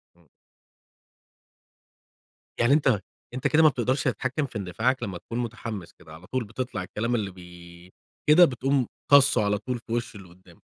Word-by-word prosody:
إمم. - - -27 2.3
يعني 120 +4 +4
أنت 135 -8 +3 0.3
أنت 130 +3 -1
كده 155 +2 +4
ما 155 - +8
بتقدرش 130 +1 -1
تتحكم 135 +3 -1
في 120 - -7
اندفاعك 115 +7 -1
لمّا 95 -5 -4
تكون 115 +7 -6
مُتحمس 115 -5 -5
كده، 80 -1 -16
على 85 +3 -13
طول 130 -2 -2
بَتطَلع 110 -2 -5
الكلام 115 +6 -2
اللي 100 -4 -2
بي 90 0 -14 0.4
كده 175 +3 +8
بتقوم 130 -1 0 0.2
طاسُّه 140 -5 +6
على 100 0 +1
طول 120 +3 -4
في 115 - -14
وش 120 -2 -3
اللي 95 -3 -12
قدامك. 90 -1 -20
115 Hz, 160 wpm, -26 LUFS, 95-130 Hz, 2.3 s, ما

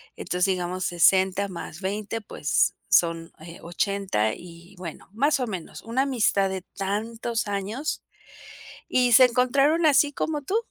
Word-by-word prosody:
entonces, 180 0 -1
digamos 185 -1 -2
60, 190 +3 +3
más 170 -1 -8
20, 210 +3 -3
pues 150 -7 0
son, 165 -1 +2
eh, 170 +2 -11
80 175 - -1
y 175 +2 -14
bueno, 175 -3 -9
más 285 +6 +2
o 250 - -1
menos, 185 -6 -7
una 235 +4 0
amistad 220 -7 +1
de 190 -1 -4 0.2
tantos 225 +4 -2
años, 205 +9 -3 0.9
y 250 -1 +3
se 255 +2 +9
encontraron 275 +6 +2
así 290 -1 +4
como 300 +1 -2
tú, 380 - -3
200 Hz, 140 wpm, -25 LUFS, 180-250 Hz, 0.9 s, se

